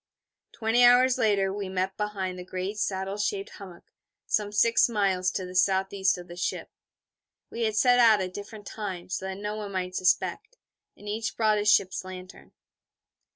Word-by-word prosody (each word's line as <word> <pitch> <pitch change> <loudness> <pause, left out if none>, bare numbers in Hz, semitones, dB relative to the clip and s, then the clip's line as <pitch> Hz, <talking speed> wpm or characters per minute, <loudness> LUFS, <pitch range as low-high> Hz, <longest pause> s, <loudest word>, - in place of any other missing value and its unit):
Twenty 225 +2 +2
hours 250 +1 +5
later 195 -3 +2
we 200 -2 -5
met 190 0 -2
behind 195 -3 -4
the - - -6
great 185 +3 -5
saddle 195 0 -2
shaped 200 -1 -2
hummock, 185 -4 -11 0.4
some 205 -1 -1
six 230 +3 +3
miles 195 -4 +1
to 185 - -4
the 180 - -9
S.E. 190 0 +1
of 175 - -11
the 175 - -10
ship. 180 - -4 0.8
We 230 0 -2
had 220 -1 -1
set 245 +2 +4
out 225 -3 +6
at 185 -1 -4
different 205 +1 -9
times, 190 -4 -5
so 190 - -7
that 190 - -4
no 210 +1 -4
one 205 -2 -6
might 185 -1 -3
suspect. 440 - 0 0.4
And 205 - -13
each 220 +2 -3
brought 215 -2 +2
a 205 - -2
ship's 195 -3 +3
lantern. 185 0 -11
200 Hz, 175 wpm, -27 LUFS, 185-215 Hz, 0.8 s, out